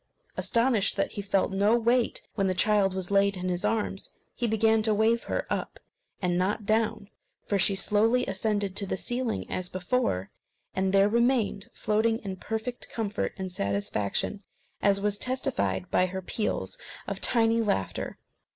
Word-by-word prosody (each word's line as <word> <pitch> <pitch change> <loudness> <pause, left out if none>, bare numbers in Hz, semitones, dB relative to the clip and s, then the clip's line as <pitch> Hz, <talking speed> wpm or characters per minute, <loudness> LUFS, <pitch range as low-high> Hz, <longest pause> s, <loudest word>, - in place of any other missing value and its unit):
Astonished 230 -4 +2
that - - 0
he 205 - -4
felt 195 -1 +1
no 205 +4 +3
weight 240 +1 +1
when 195 -3 0
the 185 - 0
child 200 -1 +3
was 190 0 -3
laid 200 0 +3
in 185 0 -2
his 180 +1 -2
arms, 210 -2 -1 0.2
he 240 - -1
began 220 0 +3
to 215 -1 +2
wave 225 +2 +2
her - - -2
up - - -3 0.4
and 175 0 +1
not 200 +3 0
down; 215 -1 +1 0.4
for 200 - 0
she 195 +1 +4
slowly 220 +5 +3
ascended 200 0 -1
to 200 - +1
the - - -2
ceiling 245 +3 -2
as 180 -1 -3
before, 185 - -1 0.4
and 190 0 +1
there 195 +1 +5
remained 235 -2 +1
floating 220 +1 +1
in 195 -2 -4
perfect 225 +5 -4
comfort 210 -3 -2
and 190 -1 -4
satisfaction, 100 - -1 0.4
as 200 0 +3
was 205 0 0
testified 100 - -1
by 185 - +3
her 190 +1 -5
peals 220 - -2 0.3
of - - -4
tiny 230 -1 +3
laughter. 95 - -2
205 Hz, 160 wpm, -28 LUFS, 190-225 Hz, 0.4 s, there